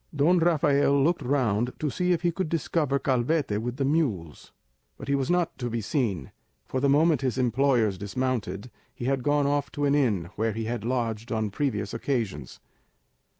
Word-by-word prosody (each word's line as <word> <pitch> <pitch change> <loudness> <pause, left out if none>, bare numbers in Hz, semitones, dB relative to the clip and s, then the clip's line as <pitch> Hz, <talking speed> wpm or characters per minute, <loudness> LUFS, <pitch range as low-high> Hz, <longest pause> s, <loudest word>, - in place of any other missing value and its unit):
Don 165 +5 +4
Rafael 145 -4 +3
looked 170 +2 +1
round 125 -3 0
to 150 -2 -2
see 180 +8 0
if 175 -1 0
he 175 - +2
could 170 -1 -3
discover 155 -3 0
Calvete 130 -3 0
with 120 +2 -4
the 140 - 0
mules; 115 - -1 0.5
but - - -9
he 140 - +1
was 140 +1 0
not 175 -1 +1
to 120 -1 -2
be 115 0 -2
seen, 105 - -2 0.3
for 130 - -2
the 140 +1 +2
moment 155 0 +4
his 130 -2 -1
employers 120 -5 +2
dismounted, 115 -1 -3 0.2
he 120 - -6
had 135 0 0
gone 145 +2 +2
off 145 0 0
to 145 - -1
an 140 - +3
inn 105 - +1
where 110 0 0
he 115 +2 -3
had 115 -1 -3
lodged 115 -2 -2
on 110 -2 -1
previous 105 -5 -2
occasions. 115 - -3
130 Hz, 185 wpm, -26 LUFS, 115-145 Hz, 0.5 s, Don